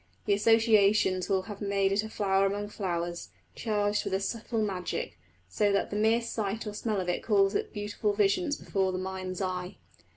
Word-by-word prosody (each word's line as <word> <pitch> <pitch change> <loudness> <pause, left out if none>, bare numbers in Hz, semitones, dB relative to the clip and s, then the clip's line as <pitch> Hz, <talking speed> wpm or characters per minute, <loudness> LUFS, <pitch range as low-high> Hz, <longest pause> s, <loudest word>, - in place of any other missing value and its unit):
The - - +3
associations 210 -3 +4
will 190 -1 +2
have 205 0 -9
made 200 -1 +1
it 200 +1 +2
a 220 - -6
flower 195 -2 +2
among 205 +1 -3
flowers, 175 -4 -3 0.2
charged 210 -2 0
with - - -1
a - - +1
subtle 225 +2 -2
magic, 190 -4 -3 0.3
so 205 - +1
that 200 - 0
the - - -3
mere 220 +3 +3
sight 220 -1 -3
or 210 - -5
smell 210 -1 -2
of 180 - -3
it 180 - -1
calls 200 -3 +3
up - - -1
beautiful 210 0 -2
visions 210 - +1
before 190 -1 -1
the 185 - -3
mind's 185 0 -4
eye. 180 -1 -3
200 Hz, 190 wpm, -29 LUFS, 190-215 Hz, 0.3 s, associations